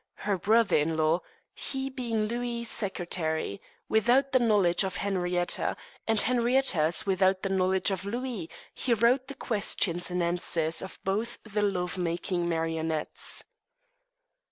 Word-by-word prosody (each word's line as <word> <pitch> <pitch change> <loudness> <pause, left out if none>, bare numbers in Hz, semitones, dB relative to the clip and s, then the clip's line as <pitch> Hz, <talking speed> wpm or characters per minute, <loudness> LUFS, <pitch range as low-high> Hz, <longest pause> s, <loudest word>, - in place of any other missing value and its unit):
her 205 -1 +2
brother 220 +5 +3
in 160 +2 0
law, 160 +3 +2 0.3
he 270 -1 -3
being 240 -5 -2
Louis's 235 +1 -1
secretary, 170 - -1 0.3
without 245 +5 +3
the 255 - +4
knowledge 205 -7 +3
of 190 -1 -3
Henrietta, 180 -3 -1 0.3
and 225 -1 +2
Henrietta's 235 - +2
without 190 -1 +2
the 195 - -1
knowledge 190 +1 +1
of 190 -1 -3
Louis, 230 -4 -4 0.2
he 240 -3 +1
wrote 245 +4 +2
the 275 - -8
questions 195 -8 0
and 180 0 -1
answers 170 -2 +2
of 190 - -8
both 210 +5 -2
the 210 -1 -2
love 185 -3 -1
making 175 0 -1
marionettes. 160 -1 -1
195 Hz, 130 wpm, -28 LUFS, 175-235 Hz, 0.3 s, the